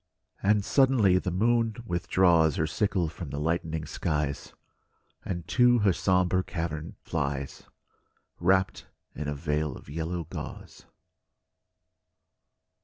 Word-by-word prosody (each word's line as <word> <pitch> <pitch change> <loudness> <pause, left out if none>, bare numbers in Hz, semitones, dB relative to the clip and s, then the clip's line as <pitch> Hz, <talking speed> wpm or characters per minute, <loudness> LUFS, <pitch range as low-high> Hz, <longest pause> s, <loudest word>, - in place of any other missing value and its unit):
And 105 0 +2
suddenly 125 -9 +4
the 90 - -3
moon 115 +4 +1
withdraws 85 -4 +3
Her 80 - +1
sickle 95 +1 0
from 80 0 -7
the 70 - -4
lightening 80 0 -1
skies, 75 -3 -3 0.7
And 85 -3 -5
to 125 -1 +5
her 95 - +5
sombre 90 0 +2
cavern 80 -4 -4
flies, 70 -1 -3 0.7
Wrapped 95 +2 +1 0.3
in 75 0 -5
a 75 - -2
veil 75 +1 -2
of - - -15
yellow 85 +2 -3
gauze. - - -9
85 Hz, 110 wpm, -28 LUFS, 75-95 Hz, 0.7 s, to